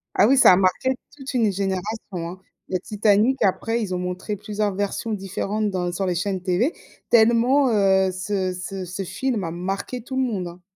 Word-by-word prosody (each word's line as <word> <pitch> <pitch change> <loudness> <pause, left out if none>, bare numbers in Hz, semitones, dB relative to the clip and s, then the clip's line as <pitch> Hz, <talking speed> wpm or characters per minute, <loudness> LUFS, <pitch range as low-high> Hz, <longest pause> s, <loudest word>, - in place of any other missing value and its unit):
Ah - - +5
oui, 270 +2 +4
ça - - +8
a 180 - +6
marqué 190 +7 +2 0.2
toute 275 -1 -7
une 230 -5 +2
génération, 195 +3 -2 0.3
hein. 185 +2 -9 0.3
Le 185 - -1
Titanic, 210 +6 +2
après 225 +4 +1
ils 190 -4 -3
ont - - -1
montré 180 +3 -3
plusieurs 210 0 -2
versions 205 +3 -2
différentes 205 +2 -2
dans 180 -2 -1
sur 190 +2 -2
les 180 - 0
chaînes 190 +1 -2
TV 185 - +1 0.4
tellement, 240 +4 +4
heu, 190 -3 +3
ce 190 0 -2
ce 185 +1 -5
ce 180 +2 -5
film 230 +2 -2
a 165 - -3
marqué 195 +8 -4
tout 260 +2 -6
le 265 - +1
monde, 205 -8 -2
hein. 175 +1 -13
200 Hz, 195 wpm, -23 LUFS, 185-225 Hz, 0.4 s, ça